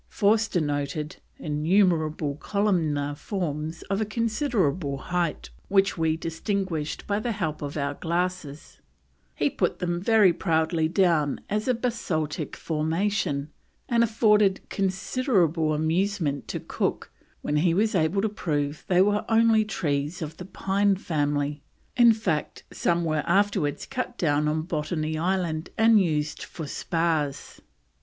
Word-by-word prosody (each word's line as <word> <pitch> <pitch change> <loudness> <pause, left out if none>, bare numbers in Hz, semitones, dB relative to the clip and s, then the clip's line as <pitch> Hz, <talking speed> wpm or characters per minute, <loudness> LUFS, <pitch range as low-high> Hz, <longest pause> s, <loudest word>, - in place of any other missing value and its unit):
Forster 210 -2 +2
noted 145 +2 -3 0.2
"innumerable 155 -1 +1
columnar 160 -8 0
forms 155 -1 -4
of 195 +2 -2
a - - +3
considerable 210 - 0
height 170 - -2 0.2
which 195 0 +3
we 160 -2 +1
distinguished 165 -1 -3
by 205 0 0
the 235 +1 -2
help 160 -7 -3
of 145 +1 -5
our 140 0 -1
glasses"; 170 -2 -3 0.5
he - - +1
put - - -1
them 175 -1 -2
very 210 -3 +5
proudly 160 -1 +1
down 165 -5 +2
as 210 +3 -1
of 245 -2 0
basaltic 160 - -2
formation, 160 -2 -1 0.4
and 235 -1 +3
afforded 210 -3 +3
considerable 190 - +1
amusement 160 0 0
to - - -3
Cook - - -3 0.3
when 150 - 0
he 165 +2 +2
was 215 +3 +2
able 185 +2 +1
to - - +3
prove 150 -7 -2
they 180 0 +5
were 205 +1 +1
only 225 -1 +4
trees 155 -5 -2
of 155 +1 -7
the 180 - -8
Pine 195 +1 +1
family; 145 -4 -1 0.3
in 240 -1 +7
fact, 185 -9 -2
some 170 0 +1
were 155 -2 0
afterwards 180 -6 +1
cut 255 -2 -4
down 150 -2 +1
on 155 +1 0
Botany 155 -1 -2
Island 170 -2 -1
and 225 -1 +6
used 150 -4 -1
for 160 - -7
spars. 155 -2 -2
170 Hz, 135 wpm, -26 LUFS, 150-200 Hz, 0.5 s, in